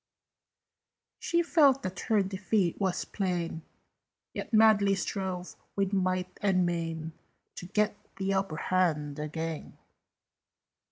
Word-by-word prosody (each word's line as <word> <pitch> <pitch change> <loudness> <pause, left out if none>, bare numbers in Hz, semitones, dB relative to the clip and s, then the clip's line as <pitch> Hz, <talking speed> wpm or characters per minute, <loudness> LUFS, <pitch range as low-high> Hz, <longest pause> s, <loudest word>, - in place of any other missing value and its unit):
She 340 0 +1
felt 285 -6 +4
that 185 -1 -4
her 215 -3 +4
defeat 190 -1 0
was 190 -2 0
plain, 175 -4 -2 0.7
Yet - - -5
madly 215 -3 +5
strove 185 -1 -3 0.2
with 195 0 0
might 185 -1 0
and 185 -3 +3
main 165 -2 -2 0.5
To 180 - -6
get 210 +2 +1 0.2
the 195 0 -1
upper 195 -5 -1
hand 155 -6 0
again. 160 +1 -4
185 Hz, 110 wpm, -29 LUFS, 170-200 Hz, 0.7 s, madly